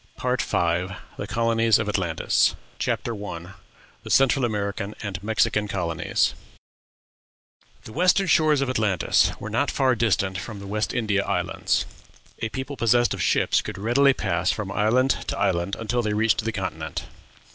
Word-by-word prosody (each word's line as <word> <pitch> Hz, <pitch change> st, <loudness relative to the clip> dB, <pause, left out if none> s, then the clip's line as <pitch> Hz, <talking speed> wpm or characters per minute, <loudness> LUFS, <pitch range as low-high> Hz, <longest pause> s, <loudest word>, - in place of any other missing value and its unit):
PART 125 Hz, 0 st, 0 dB
V. 100 Hz, -, -1 dB, 0.6 s
THE -, -, -5 dB
COLONIES 115 Hz, -1 st, +2 dB
OF 110 Hz, -, -2 dB
ATLANTIS. 90 Hz, -6 st, +1 dB, 0.2 s
CHAPTER 120 Hz, -, -1 dB
I. 85 Hz, -2 st, -7 dB, 0.5 s
THE -, -, -10 dB
CENTRAL 135 Hz, -1 st, +4 dB
AMERICAN 100 Hz, -2 st, -3 dB
AND 100 Hz, -1 st, -4 dB
MEXICAN 105 Hz, 0 st, +1 dB
COLONIES. 85 Hz, -5 st, 0 dB, 1.5 s
The 110 Hz, -, -11 dB
western 180 Hz, +4 st, +3 dB
shores 155 Hz, -4 st, +3 dB
of 135 Hz, -, 0 dB
Atlantis 105 Hz, -8 st, +2 dB
were -, -, -6 dB
not -, -, +1 dB
far 130 Hz, -1 st, +2 dB
distant 100 Hz, -5 st, 0 dB
from 110 Hz, +2 st, -7 dB
the 100 Hz, -, -9 dB
West 105 Hz, +2 st, -2 dB
India 105 Hz, -5 st, 0 dB
Islands; -, -, -1 dB, 0.5 s
a 110 Hz, -, -2 dB
people 130 Hz, +4 st, -5 dB
possessed 120 Hz, 0 st, +3 dB
of -, -, -4 dB
ships -, -, +2 dB
could -, -, -7 dB
readily 125 Hz, +7 st, +3 dB
pass 90 Hz, -1 st, 0 dB
from 100 Hz, -3 st, -4 dB
island 120 Hz, +6 st, +2 dB, 0.2 s
to -, -, -2 dB
island 95 Hz, -1 st, 0 dB
until 115 Hz, +2 st, -1 dB
they 105 Hz, -2 st, -1 dB
reached 110 Hz, 0 st, +2 dB
the 115 Hz, -, 0 dB
continent. 80 Hz, -7 st, -4 dB
110 Hz, 155 wpm, -24 LUFS, 100-120 Hz, 1.5 s, CENTRAL